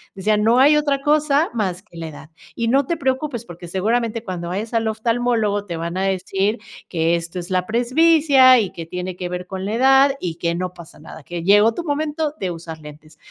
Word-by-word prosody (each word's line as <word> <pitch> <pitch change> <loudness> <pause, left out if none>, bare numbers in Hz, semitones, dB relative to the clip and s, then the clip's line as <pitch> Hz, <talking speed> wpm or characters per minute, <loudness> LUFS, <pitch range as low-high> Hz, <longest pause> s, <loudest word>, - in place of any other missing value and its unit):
decían, 210 +2 +1
no 230 +3 +4
hay 290 +3 +6
otra 285 -2 0
cosa 295 +1 +2
más 190 -6 -2
que 190 -5 -16
la 165 -1 -5
edad, 155 0 -11 0.3
y 230 - -1
no 270 +4 +3
te 335 +4 -2
preocupes 265 -3 -2
porque 175 -2 -10
seguramente 225 +5 -1
cuando 175 -4 -5
vayas 210 +6 -4
al 225 -1 +1
oftalmólogo 220 -2 0
te 170 -4 -5
van 170 +2 -4
a 190 - 0
decir 195 +3 -1 0.3
que 165 0 +1
esto 170 +1 -5
es 175 +1 -8
la 185 -1 0
presbicia 260 - +5
y 205 -4 -2
que 165 - -8
tiene 180 +2 -5
que 180 0 -5
ver 180 0 -5
con 190 0 -5
la 205 - -3
edad 270 +3 +4
y 170 -3 -4
que 170 0 -2
no 180 0 -4
pasa 170 -2 -14
nada, 155 0 -12
que 170 +2 -6
llegó 205 +4 +5
tu 345 - -5
momento 300 0 -2
de 185 -2 -2
usar 165 -1 -8
lentes, 150 +1 -14
210 Hz, 215 wpm, -20 LUFS, 175-255 Hz, 0.3 s, hay